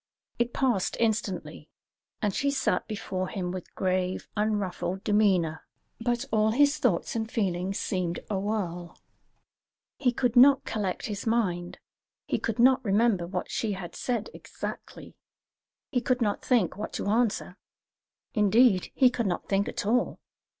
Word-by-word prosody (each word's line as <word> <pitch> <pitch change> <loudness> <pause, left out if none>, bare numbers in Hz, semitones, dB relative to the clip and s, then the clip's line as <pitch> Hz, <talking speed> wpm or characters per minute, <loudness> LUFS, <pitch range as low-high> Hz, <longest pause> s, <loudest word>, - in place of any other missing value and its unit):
It 240 0 +1
passed 240 -9 0
instantly, 195 -9 -2 0.5
and 205 -2 +1
she 280 - +1
sat 275 -2 0
before 190 -3 -3
him 185 -3 -3
with 185 -1 -8
grave, 185 0 -1
unruffled 200 -3 -1
demeanour; 190 -7 +2 0.4
but 240 0 -1
all 215 0 +3
his 285 +6 +3
thoughts 230 - +1
and 220 0 -2
feelings 190 -3 -1
seemed 180 -3 -2
a 200 -3 -1
whirl. 180 -4 -3 1.0
He 250 -3 +3
could 245 0 0
not 270 +2 +7
collect 205 -1 -2
his 210 -2 -4
mind; 180 -7 0 0.5
he - - -1
could 225 - -2
not 260 +2 +5
remember 205 -4 +2
what 180 0 -4
she 215 -3 -1
had 180 -3 -7
said 240 -4 -2
exactly; - - -8 0.8
he 250 -4 +1
could 250 +1 +1
not 210 -4 0
think 230 -10 +2
what 210 +2 -6
to - - -3
answer; 215 -3 0 0.8
indeed, 210 -2 +4
he 255 -2 +5
could 235 -4 -1
not 175 - -2
think 195 0 +1
at - - -4
all. 240 +4 +1
210 Hz, 145 wpm, -28 LUFS, 185-235 Hz, 1.0 s, not